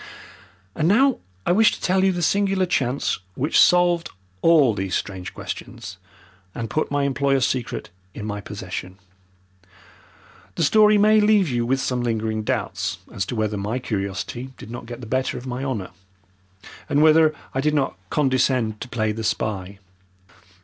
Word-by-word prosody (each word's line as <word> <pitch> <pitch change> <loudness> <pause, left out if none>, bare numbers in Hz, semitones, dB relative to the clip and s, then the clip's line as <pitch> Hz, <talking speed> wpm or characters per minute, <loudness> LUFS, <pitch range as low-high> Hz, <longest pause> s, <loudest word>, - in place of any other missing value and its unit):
And 155 - 0
now 260 +8 +4 0.3
I - - +2
wish 215 +4 +5
to - - -7
tell 190 +1 +1
you 190 - +4
the 175 -1 -2
singular 195 +1 +2
chance 135 -6 0 0.2
which 145 +5 +1
solved 175 -1 +4 0.3
all 150 -8 +5
these 95 -2 -2
strange 95 -2 -4
questions - - -7 0.6
and 115 -2 -5
put 155 - 0
my 145 0 0
employer's 140 -1 +1
secret 125 -8 -3 0.2
in 105 - -6
my 105 -1 -4
possession. 95 -2 -7 1.6
The 165 - 0
story 210 +6 +5
may 215 +1 +5
leave 210 -5 +4
you 120 -2 -1
with 135 +2 +1
some 125 -2 -1
lingering 110 -2 -1
doubts 105 - -2 0.2
as 90 -2 -2
to - - -4
whether 110 -1 -1
my 105 +5 -2
curiosity 105 +2 -4
did 110 - -10
not 120 -1 -7
get 120 +1 -8
the - - -7
better 130 +3 -1
of 125 - -8
my 125 +1 -4
honour, 120 -9 -3 1.0
and 145 +1 +3
whether 155 0 +5 0.2
I 135 - 0
did 150 +1 +1
not 135 - 0
condescend 130 -6 +1
to 130 - -6
play 110 -2 0
the 110 +1 -5
spy. 100 -3 -2
130 Hz, 165 wpm, -23 LUFS, 110-160 Hz, 1.6 s, wish